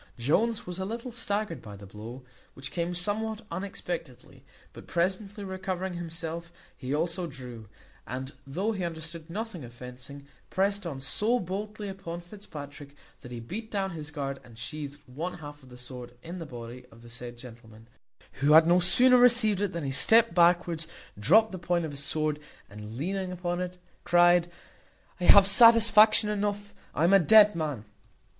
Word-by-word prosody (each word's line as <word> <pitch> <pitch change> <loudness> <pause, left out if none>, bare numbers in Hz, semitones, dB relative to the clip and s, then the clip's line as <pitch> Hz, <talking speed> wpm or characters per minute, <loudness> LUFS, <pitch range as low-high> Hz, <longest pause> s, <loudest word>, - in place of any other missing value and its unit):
Jones 210 - 0
was 180 +1 -6
a - - -2
little 230 +5 -5
staggered 205 - -3
by 105 -2 -10
the 100 0 -12
blow, 110 +6 -10 0.3
which 135 - -6
came 175 0 -3
somewhat 215 +4 -2
unexpectedly; 170 -6 -7 0.3
but - - -13
presently 195 +4 -2
recovering 190 -1 -4
himself 170 0 -6 0.2
he 130 -1 -7
also 170 +4 -1
drew, 125 -7 -10 0.4
and 130 +3 -6
though 190 +11 -2
he 195 -4 -4
understood 165 0 -7
nothing 205 - -6
of 120 - -10
fencing, 125 +3 -11 0.2
prest 200 0 0
on 140 -5 -6
so 210 - 0
boldly 210 +2 -5
upon 190 -3 -7
Fitzpatrick, 150 -7 -11 0.2
that 125 - -12
he 120 - -6
beat 210 - -7
down 195 -3 -2
his 155 -3 -7
guard, 140 -3 -5
and 115 -2 -16
sheathed 145 +4 -7
one 160 +9 -5
half 145 -3 -11
of 130 - -17
his 125 0 -11
sword 125 -1 -9
in 175 +2 -7
the 165 - -7
body 120 -1 -9
of 115 +1 -17
the 120 - -13
said 120 +1 -8
gentleman, 115 -2 -14 0.5
who 145 +3 +4
had 160 +1 +8
no 175 +2 +4
sooner 250 +8 +6
received 235 -5 +4
it 205 -2 0
than 170 -3 -5
he 135 - -2
stept 225 - +5
backwards, 170 -2 +2 0.3
dropped 210 - +4
the 185 - -6
point 175 -1 -1
of 155 - -6
his 140 0 -4
sword, 155 0 -1 0.3
and 105 +2 -9
leaning 185 +5 -3
upon 175 0 -3
it, 180 0 -5 0.3
cried, 175 0 +4 0.7
"I 180 - -2
have 200 +1 +8
satisfaction 220 0 +7
enough: 205 -1 -3 0.2
I 155 - 0
am 175 +3 +4
a 195 - +8
dead 210 +3 +6
man." 150 -9 -4
170 Hz, 175 wpm, -28 LUFS, 135-200 Hz, 0.7 s, had